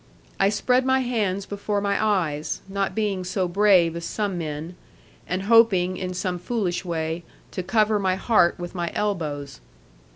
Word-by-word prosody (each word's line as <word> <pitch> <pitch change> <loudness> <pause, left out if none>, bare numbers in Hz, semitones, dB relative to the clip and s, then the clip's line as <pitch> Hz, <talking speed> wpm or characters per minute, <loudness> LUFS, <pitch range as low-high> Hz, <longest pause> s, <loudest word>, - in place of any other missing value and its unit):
I 195 - +4
spread 250 +5 +2
my 260 0 +2
hands 205 -6 -1
before 205 0 -2
my 200 +1 0
eyes, 165 -8 0
not 195 0 -2
being 205 -4 -1
so 185 0 -1
brave 180 -3 +4
as 170 - -5
some 205 +1 -2
men; 160 +1 -5 0.5
and 185 +1 -2
hoping, 200 -5 +4
in 185 0 -4
some 180 -1 -2
foolish 190 -3 -2
way, 165 -1 -3 0.3
to - - -3
cover 210 +3 +2
my 190 -2 +1
heart 190 -3 +3
with 175 0 -6
my 175 -2 -3
elbows. 150 - -3
190 Hz, 160 wpm, -24 LUFS, 175-210 Hz, 0.5 s, I